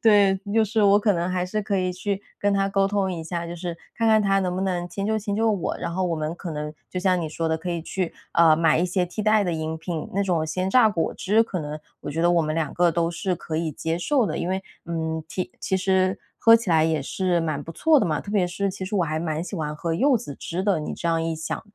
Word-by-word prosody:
对， 205 -3 +5 0.2
就 225 - +5
是 220 +1 0
我 200 +1 +6
可 205 -1 +3
能 175 0 -1
还 180 -1 0
是 210 +4 -2
可 200 -1 -1
以 185 -1 0
去 195 +2 -3 0.2
跟 205 0 +1
他 195 0 +2
沟 195 0 +2
通 195 -2 0
一 165 -2 -5
下， 170 0 -3
就 170 +1 -6
是 170 -1 -5 0.2
看 230 - +1
看 220 -1 +5
他 195 -1 +3
能 180 -2 -1
不 185 - -2
能 180 -2 -1
迁 195 +2 -4
就 220 +1 +1
迁 205 -1 -3
就 225 +1 +2
我， 200 -5 -1
然 170 - -3
后 185 +1 0
我 170 - 0
们 155 0 -2
可 175 -3 -6
能 150 0 -4 0.2
就 185 - -4
像 185 -1 +2
你 160 - -3
说 165 +1 -2
的， 160 - 0
可 180 +3 -6
以 170 -1 -2
去， 180 +1 -3 0.2
呃， 165 -2 +6
买 160 -1 +3
一 180 - +2
些 180 0 +1
替 180 +5 -6
代 215 0 +4
的 175 -3 -1
饮 160 0 -3
品， 165 -1 -5
那 200 - +2
种 170 -5 0
鲜 185 +4 -1
榨 240 0 +6
果 170 -6 -1
汁 215 +4 +3
可 195 -5 -4
能 150 -1 -4 0.3
我 - - -4
觉 165 +3 -1
得 175 - +4
我 170 -1 +4
们 155 0 -1
两 160 -3 -1
个 175 -1 +3
都 170 0 +1
是 180 +2 -1
可 160 -1 -5
以 165 -1 -1
接 165 +4 -2
受 260 +5 +2
的， - - -3
因 175 - -2
为， 190 +1 -1 0.2
嗯， 160 -1 -2
其 185 - -3
其 190 - 0
实 190 0 +1 0.2
喝 230 0 +7
起 230 -5 +2
来 160 -1 +4
也 160 -2 +1
是 180 +3 0
蛮 155 -3 -2
不 165 - -8
错 315 - +4
的 210 - +1
嘛， 155 -2 0
特 205 - -8
别 195 -4 +2
是 195 +3 -2
其 190 0 -6
实 200 - -5
我 180 -4 +2
还 155 0 -2
蛮 160 -1 -2
喜 190 +2 -6
欢 150 -1 -3
喝 165 +2 -3
柚 265 - +4
子 175 - -7
汁 175 +3 -3
的， 195 -5 +2
你 - - -4
这 170 - -3
样 165 0 +2
一 165 0 -1
想 160 +1 -4
180 Hz, 305 characters per minute, -24 LUFS, 165-200 Hz, 0.3 s, 喝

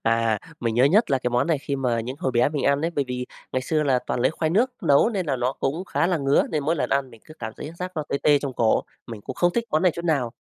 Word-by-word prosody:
À, 115 -1 +2 0.2
mình 115 -2 -1
nhớ 125 +3 +4
nhất 200 +11 +4
là 135 - +3
cái 125 - -2
món 120 +5 +1
này 165 -3 +1
khi 140 0 -3
mà 125 -3 0
những 125 +4 -5
hồi 130 - -1
bé 120 +3 +3
mình 145 -3 -3
ăn 140 0 +3
ấy. 165 +2 0
Bởi 145 -4 -1
vì 125 0 -3 0.3
ngày 130 - 0
xưa 155 +2 0
là 135 -3 +2
toàn 120 - -1
lấy 130 - +3
khoai 160 0 -1
nước 235 +9 +2
nấu 140 +9 +4
nên 195 -7 -2
là 135 - 0
nó 125 +1 0
cũng 155 +7 -3
khá 170 - 0
là 180 - +1
ngứa, 140 0 +3
nên 150 -3 -1
mỗi 160 +3 +1
lần - - -1
ăn 135 -1 0
mình 115 -2 -16
cứ 155 - -13
cảm 110 -1 -5
thấy 150 - -7
giác 180 0 -4
nó 155 - 0
tê 140 - -1
tê 145 -1 +5
trong 140 -2 -4
cổ, 115 -3 +2 0.2
mình 115 -3 -8
cũng 130 - -7
không 175 0 +2
thích 235 +3 0
món 155 - +1
này 180 -3 +4
chút 170 - -6
nào. 135 -8 0
140 Hz, 315 wpm, -24 LUFS, 125-160 Hz, 0.3 s, tê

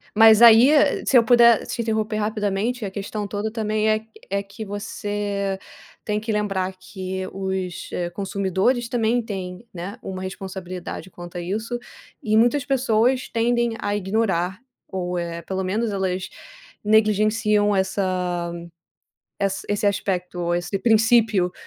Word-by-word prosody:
Mas 220 0 +7
aí, 235 +3 +9 0.4
se 265 - +5
eu 235 - +6
puder 235 -1 +5
te 235 - -3
interromper 220 -1 -1
rapidamente, 210 +2 -1
a 195 - -5
questão 205 +1 -4
toda 205 +2 -3
também 215 -1 0
é 215 0 +1 0.2
é 200 +1 -1
que 200 +2 -9
você 205 -1 -3 0.5
tem 210 0 0
que 220 +1 -4
lembrar 195 -3 -1
que 185 0 -5
os 190 -2 -4 0.2
consumidores 200 +5 0
também 235 0 +1
têm, 190 -1 -6
né, 185 +6 -6
uma 185 -1 -5
responsabilidade 190 -1 -6
quanto 175 0 -9
a - - -3
isso, 220 +7 -3 0.4
e 215 0 +1
muitas 245 +5 +3
pessoas 255 -1 +1
tendem 235 0 +1
a 205 - -1
ignorar, 190 -2 0 0.3
ou, 180 -1 -3
eh, 170 0 -4
pelo 190 +1 -3
menos 215 +4 -1
elas 190 -1 -2 0.5
negligenciam 215 0 +3
essa 185 -3 -1 0.9
essa 195 0 -1
esse 205 0 0
aspecto 180 -3 -1
ou 175 0 0
esse 175 +3 -2
princípio, 220 -4 +3
205 Hz, 135 wpm, -23 LUFS, 190-220 Hz, 0.9 s, aí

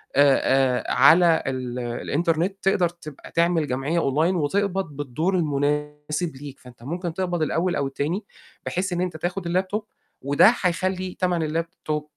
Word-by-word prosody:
آآ، 135 -2 +4
آآ - - -2
على 160 +5 +6
ال 125 -2 -3
الإنترنت، 165 - -1
تقدر 185 -3 +2
تبقى 155 -4 -12
تعمل 170 -2 +2
جمعيّة 135 +6 -1
online 160 +5 +1
وتقبَض 185 0 -1
بالدور 150 +7 -1
المناسِب 150 +1 -1
ليك، 140 -2 -9
فأنت 125 -2 -16
ممكن 170 +4 -4
تقبَض 175 -2 -2
الأول 170 +3 0
أو 140 - 0
التاني 150 +9 -3 0.4
بحيث 185 +1 -2
إن 175 - -1
أنت 175 -3 -2
تاخُد 175 +2 -3
الlaptop 185 +4 0 0.4
وده 145 - +5
حيخلّي 185 -2 -1
تَمن 175 -4 0
الlaptop 155 -2 -5
165 Hz, 145 wpm, -24 LUFS, 145-180 Hz, 0.4 s, على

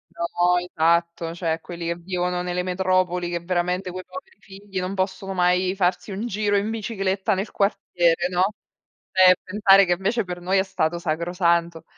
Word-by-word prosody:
No, 175 +1 +1
esatto 170 -1 0
cioè 165 -2 -1
quelli 170 0 -7
che 170 - -1
vivono 180 0 -2
nelle 180 0 -2
metropoli 185 -1 0
che 175 0 -2
veramente 180 +1 -1
quei 185 +1 -7
poveri 185 +1 -11
figli 195 -1 -8
non 185 +1 -3
possono 195 0 -2
mai 180 +1 +2
farsi 180 +1 0
un 200 +4 -4
giro 205 -1 0
in 200 +2 -1
bicicletta 200 -2 -1
nel 195 +3 -3
quartiere, 175 -4 +1
no, 180 0 +1 0.7
cioè 185 -1 +7
e 185 - +7
pensare 195 0 +5
che 175 - +1
invece 210 +6 0
per 180 -1 -6
noi 185 +2 +1
è 190 - +4
stato 170 -3 -1
sacrosanto. 170 0 0
180 Hz, 170 wpm, -23 LUFS, 175-195 Hz, 0.7 s, cioè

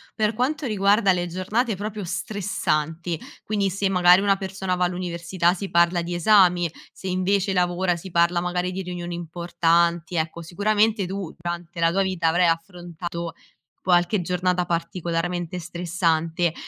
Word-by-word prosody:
per 215 0 +1
quanto 275 +5 -1
riguarda 200 -2 +3
le 175 -1 -1
giornate 200 +6 -1
proprio 210 +1 -5
stressanti, 170 -4 -2 0.2
quindi 200 -2 0
se 195 +1 -1
magari 180 0 +5
una 200 -1 +3
persona 190 -1 -3
va 180 0 +1
all'università 175 0 0
si 195 +1 -5
parla 170 +1 +3
di 175 +1 -4
esami, 180 -2 +4 0.2
se - - -14
invece 190 +2 +1
lavora 180 0 +1
si 185 +3 -9
parla 170 0 +2
magari 180 0 -1
di 190 +1 -4
riunioni 175 -1 -5
importanti, 170 0 0
ecco 165 +1 -2
sicuramente 210 +4 +1
tu 190 -2 -5
durante 175 0 -5
la 165 0 +3
tua 195 - +1
vita 185 -4 +1
avrai 175 +2 +3
affrontato 170 0 -4 0.5
qualche 175 +2 +3
giornata 180 0 0
particolarmente 175 +1 -2
stressante. 170 -1 0
180 Hz, 145 wpm, -24 LUFS, 170-195 Hz, 0.5 s, magari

